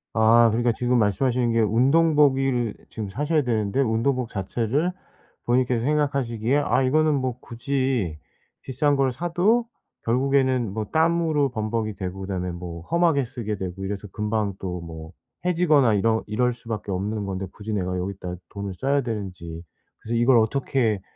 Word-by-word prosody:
아 115 +1 +6
그러니까 120 +1 +2
지금 120 +1 +1
말씀하시는 120 +4 +1
게 115 - +2
운동복이 135 +4 +3
을 120 -4 0 0.2
지금 105 -3 -5
사셔야 150 +8 0
되는데 110 -1 -1
운동복 120 +1 0
자체를 120 - -1 0.5
본인께서 120 -1 +1
생각하시기에 140 -4 0
아 135 -2 +2
이거는 155 +3 +3
뭐 130 -2 -2
굳이 120 - -2 0.4
비싼 140 +2 +1
걸 135 -2 +2
사도 175 - +1 0.4
결국에는 130 -2 +2
뭐 110 0 -3
땀으로 160 -3 +2
범벅이 110 -2 -2
되고 95 0 -5
그다음에 90 -2 -3
뭐 85 -1 -7
험하게 165 -5 +3
쓰게 110 -3 -4
되고 95 +1 -5
이래서 100 +1 -4
금방 105 -1 -1
또 90 -2 -4
뭐 80 -1 -9 0.3
해지거나 155 -10 +3
이런 110 +2 +2
이럴 125 +3 +1
수밖에 110 -4 -6
없는 100 +2 -2
건데 95 0 -3
굳이 105 +1 -6
내가 90 -2 -1
여기다 90 -1 -4 0.2
돈을 100 -1 -5
써야 140 +4 +1
되는지. 90 -8 -5 0.4
그래서 115 +2 -4
이걸 120 +1 +5
어떻게 115 -3 +1
115 Hz, 350 characters per minute, -24 LUFS, 100-135 Hz, 0.5 s, 아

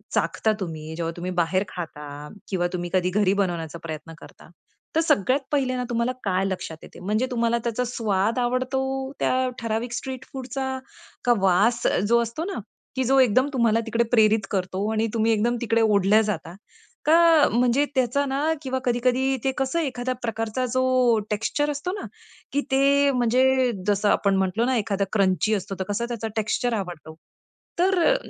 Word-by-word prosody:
चाखता 220 - +1
तुम्ही, 160 -4 -6
जेव्हा 165 0 -2
तुम्ही 180 +1 -4
बाहेर 185 +3 +1
खाता 150 -4 -7 0.2
किंवा 175 -3 0
तुम्ही 175 -1 -3
कधी 180 -1 +2
घरी 200 -2 +3
बनवण्याचा 170 -3 -4
प्रयत्न 165 0 -7
करता? 170 - -15 0.5
तर 325 - +4
सगळ्यात 255 -3 +2
पहिल्यांदा 255 -3 0
तुम्हाला 235 +1 0
काय 190 -1 +1
लक्षात 185 -4 -4
येते. - - -13
म्हणजे 210 +7 0
तुम्हाला 235 -1 +1
त्याचा 235 +1 0
स्वाद 220 -2 0
आवडतो, 265 +2 -1
त्या 255 0 +1
ठराविक 230 +1 -2
स्ट्रीट 260 +1 -5
फूडचा 265 0 -4 0.5
का 245 - +5
वास 195 +5 +3
अ, - - +2
जो 230 +5 +3
असतो 235 +8 -4
ना, 390 0 -4 0.4
की 260 - +1
जो 270 +1 +4
एकदम 255 +1 +4
तुम्हाला 230 -3 +3
तिकडे 230 +1 +1
प्रेरित 215 -3 +4
करतो 185 -1 -2
आणि 220 0 +1
तुम्ही 225 0 +2
एकदम 225 +2 +1
तिकडे 230 -1 +1
ओढल्या 210 -1 +4
जाता, 175 -5 -3 0.5
का 325 -1 +6
म्हणजे 245 +4 +3
त्याचा 260 +2 +1
ना 280 +4 0
किंवा 260 -2 -2
कधी-कधी 250 +2 +1
ते 270 - +2
कसं 270 +5 0
एखाद्या 255 -4 -2
प्रकारचा 225 +2 -2
जो 255 -3 +3
टेक्स्चर 225 +8 0
असतो 295 +5 -3
ना, - - -6 0.5
की 285 - +2
ते 280 +1 +4
म्हणजे 255 +1 +3 0.2
जसं 205 0 +2
आपण 200 -1 +2
म्हंटलो 190 +4 +1
ना, 260 +1 +1
एखादा 200 -2 0
क्रंची 195 0 +2
असतो. 195 0 -4
तर 190 - -2
कसं 205 +4 -1
त्याचा 230 -2 -3
टेक्स्चर 225 +3 0
आवडतो. 175 -4 -7 0.6
तर 375 +1 +3
अ, - - +4
230 Hz, 170 wpm, -24 LUFS, 195-260 Hz, 0.6 s, का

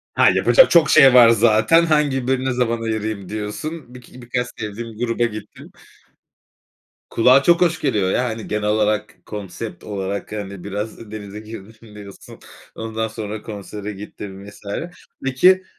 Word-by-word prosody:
Ha, - - +5
yapacak - - +5
çok 165 -4 +5
şey 135 -2 +7
var 120 -2 +8
zaten. 115 +8 +4
Hangi 145 -5 +1
birine 130 0 0
zaman 120 -2 -1
ayırayım 110 -3 -3
diyorsun. 125 +7 -6
Biki 125 0 -13
birkaç 125 +1 -3
sevdiğim 110 +1 -6
gruba 120 0 -1
gittim. 105 -2 -8 1.4
Kulağa 130 +4 +4
çok 170 +2 +4
hoş 170 -2 +2
geliyor 105 -9 +1
ya. 125 - +1
Hani, 110 -2 -5
genel 105 0 -1
olarak, 105 0 0
konsept 105 -1 -7
olarak, 100 -1 -5
hani, 100 -3 -6
biraz, 105 +2 -6
"Denize 105 -1 -8
girmişim." 110 0 -12
diyorsun. 100 -2 -12 0.4
Ondan 110 0 -3
sonra 110 -1 -6
konsere 105 0 -7
gittin 100 -1 -9
vs. 100 - -14 0.6
Peki 180 +9 +4
110 Hz, 140 wpm, -20 LUFS, 105-125 Hz, 1.4 s, var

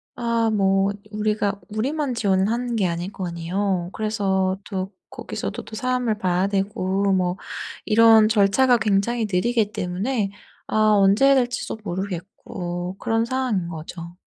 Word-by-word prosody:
아 230 -1 +1
뭐 195 -1 +2 0.2
우리가 210 -1 -1
우리만 260 +5 -1
지원하는 225 +4 +1
게 195 -5 +2
아닐 175 +3 -3
거 185 -2 -5
아니에요. 175 +1 -2
그래서 195 -3 0
또 190 -1 -4 0.2
거기서도 - - -5
또 220 - -10
사람을 250 -2 0
봐야 185 -1 +1
되고 195 -1 0
뭐 180 0 0 0.5
이런 225 0 +6
절차가 220 +4 +4
굉장히 215 +2 +1
느리기 220 +3 +1
때문에 195 +4 -2 0.3
아 - - -5 0.2
언제 200 +6 +4
해야 275 0 +6
될지도 245 -3 -1
모르겠고 180 -1 -5
그런 225 +2 0
상황인거죠. 180 -9 -3
200 Hz, 295 characters per minute, -23 LUFS, 185-230 Hz, 0.5 s, 이런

